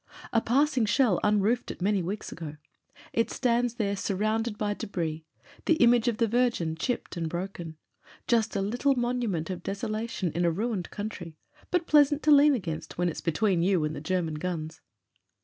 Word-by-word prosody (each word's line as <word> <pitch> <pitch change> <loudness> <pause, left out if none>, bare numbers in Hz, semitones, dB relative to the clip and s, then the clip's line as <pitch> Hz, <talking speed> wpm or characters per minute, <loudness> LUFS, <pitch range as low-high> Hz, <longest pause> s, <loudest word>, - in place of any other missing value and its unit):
A 230 - +4
passing 265 0 +2
shell 210 -3 +3
unroofed 210 +3 +2
it - - -6
many 195 +1 +1
weeks 195 +5 -4
ago; 155 -3 -7 0.6
it 230 - +1
stands 240 -1 +1
there 200 -4 -1
surrounded 215 +3 -1
by 205 -1 -1
debris 160 -6 -4 0.2
— 285 - -24
the 330 - +5
image 240 -4 +4
of 235 -3 +1
the 230 - +2
Virgin, 230 -9 +1
chipped 215 +2 -3
and 165 -1 -2
broken. 175 -2 -5 0.5
Just 225 -3 +2
a 200 - +1
little 245 +7 +1
monument 240 -9 -1
of 180 -2 -5
deso 195 +5 -4
lation 215 -5 -2
in 175 - -1
a 170 - +4
ruined 200 +1 -2
country, 185 -7 -6 0.3
but 355 -2 +1
pleasant 295 -1 +4
to 305 - +4
lean 290 0 +7
against 170 -9 -5
when 175 0 +1
it's 160 - -6
between 180 +2 +1
you 180 -2 +2
and 150 +1 -3
German 180 -4 -1
guns. 160 -2 -4
205 Hz, 180 wpm, -28 LUFS, 175-240 Hz, 0.6 s, lean